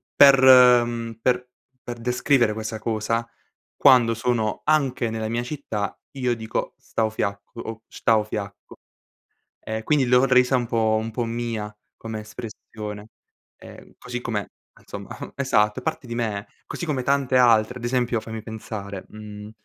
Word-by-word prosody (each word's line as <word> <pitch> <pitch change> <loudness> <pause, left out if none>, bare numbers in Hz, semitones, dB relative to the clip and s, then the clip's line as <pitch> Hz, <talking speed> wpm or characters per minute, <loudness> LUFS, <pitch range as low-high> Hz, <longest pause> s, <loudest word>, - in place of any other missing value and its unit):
per, 140 -1 +8
uhm, 120 -3 +6
per 125 0 +1 0.4
per 120 -1 -5
descrivere 125 0 +2
questa 110 +1 -5
cosa, 115 +1 -1 0.5
quando 125 -4 +5
sono 115 -2 -1
anche 135 -6 +1
nella 110 -1 -3
mia 115 +1 -1
città 120 -6 -4
io 125 -4 -1
dico 110 -1 -4
"stau 110 -1 -2
fiacco" 100 +2 -4
o 110 -1 -7
"sctau 110 -2 +2
fiacco". 100 -2 -7 0.8
E 110 0 -5
quindi 140 +3 +2
l'ho 125 +1 +5
resa 125 0 +4
un 120 -1 -1
po' 110 -1 +1
un 115 +1 -4
po' 120 +2 -2
mia 115 -2 -4 0.2
come 110 -1 -6
espressione, 105 -1 -8 0.5
ehm, - - -14
così 125 0 -5
com'è, 110 -4 -2
e - - -15 0.3
insomma, - - -8
uhm, - - -7
esatto, 105 -6 +1
è - - -18
parte 155 -4 -3
di 120 - -5
me, 110 -3 -2 0.2
così 170 - -5
come 140 -5 -1
tante 135 -1 +1
altre. 120 -1 +4
Ad 120 - -10
esempio, 120 -1 0
fammi 110 0 -7
pensare, 105 -3 -7
mhmm 105 -1 -10
115 Hz, 155 wpm, -24 LUFS, 110-125 Hz, 0.8 s, per